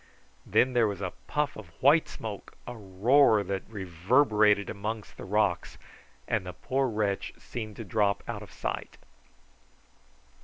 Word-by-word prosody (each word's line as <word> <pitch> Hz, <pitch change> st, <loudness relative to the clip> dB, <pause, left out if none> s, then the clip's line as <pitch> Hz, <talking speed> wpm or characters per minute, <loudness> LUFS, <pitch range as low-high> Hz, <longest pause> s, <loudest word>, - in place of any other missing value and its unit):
Then 130 Hz, 0 st, +3 dB
there 120 Hz, -3 st, +4 dB
was 100 Hz, -2 st, -4 dB
a 95 Hz, -2 st, -3 dB
puff 150 Hz, -1 st, 0 dB
of 110 Hz, -4 st, -9 dB
white 150 Hz, +5 st, +5 dB
smoke, 105 Hz, -3 st, -7 dB
a 120 Hz, -, -6 dB
roar 110 Hz, +3 st, +4 dB
that 95 Hz, +1 st, -4 dB
reverberated 105 Hz, -, +3 dB
amongst 105 Hz, +2 st, -5 dB
the -, -, -9 dB
rocks, 100 Hz, -2 st, 0 dB, 0.5 s
and -, -, 0 dB
the 90 Hz, 0 st, -7 dB
poor 135 Hz, 0 st, -1 dB
wretch 105 Hz, -3 st, -1 dB
seemed 110 Hz, -3 st, -7 dB
to 115 Hz, -, -6 dB
drop 100 Hz, 0 st, +1 dB
out -, -, -4 dB
of -, -, -11 dB
sight. -, -, -4 dB
105 Hz, 145 wpm, -29 LUFS, 100-120 Hz, 0.5 s, white